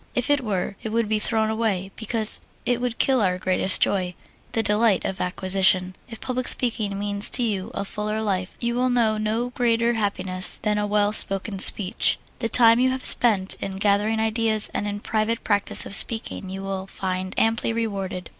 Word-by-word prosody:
If 250 +3 -1
it 290 -1 +1
were, 200 -3 -4
it 220 - -6
would 230 0 -2
be 215 0 -1
thrown 220 0 -1
away, 205 -4 -3
because 220 -1 +5 0.2
it 245 -1 -1
would 250 -1 -4
kill 260 -3 +1
our 180 -3 -1
greatest 185 0 +2
joy 180 -2 -2 0.4
the 225 - -1
delight 210 -2 0
of 190 - -5
acquisition. 185 0 0
If 230 - -10
public 255 -1 -4
speaking 220 -5 +2
means 205 0 0
to 245 - +1
you 200 -5 -3
a 200 - -4
fuller 210 +2 -5
life, 190 -3 -4
you 235 0 -3
will 250 +1 -1
know 225 -3 0
no 225 +3 -3
greater 235 -1 0
happiness 190 -4 -1
than 210 -1 -1
a 210 - -2
well 205 0 0
spoken 195 -1 +1
speech. 190 0 +4 0.2
The 230 - -3
time 230 -1 +5
you 260 +1 +2
have 260 0 -5
spent 200 -5 +6
in 195 - -6
gathering 205 +2 0
ideas 220 -1 +2
and 205 - -4
in 205 0 -6
private 220 +1 -3
practise 205 -2 -1
of - - -7
speaking 220 -2 +1
you 190 +1 -8
will 195 -1 -6
find 185 0 -6
amply 225 +1 0
rewarded. 195 -6 -5
210 Hz, 190 wpm, -22 LUFS, 195-230 Hz, 0.4 s, spent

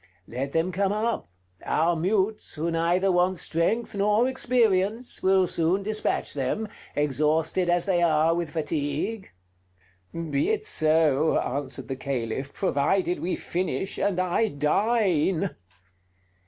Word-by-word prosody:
Let 135 +4 -4
them 165 +3 +1
come 195 +2 0
up: 215 - -2 0.3
our 165 +3 +1
mutes, 195 +5 -1
who 165 +3 -2
neither 175 +4 +2
want 180 +1 +2
strength 170 +10 -1
nor 210 +4 +2
experience, 235 -3 +1
will 190 0 +4
soon 175 +3 +1
dispatch 215 +1 -1
them, 145 +11 -2 0.3
exhausted 155 +5 +1
as 175 0 +2
they 180 -3 +1
are 160 -1 +3
with 170 -2 -2
fatigue." 155 +6 -3 0.8
"Be 170 - -1
it 435 -1 0
so," 155 - +3
answered 135 -1 -3
the 135 - -3
Caliph, 135 0 -3
"provided 180 +2 0
we 180 - -2
finish, 180 0 -3
and 190 -3 0
I 185 +5 +1
dine." 190 +2 +1
175 Hz, 125 wpm, -26 LUFS, 155-200 Hz, 0.8 s, will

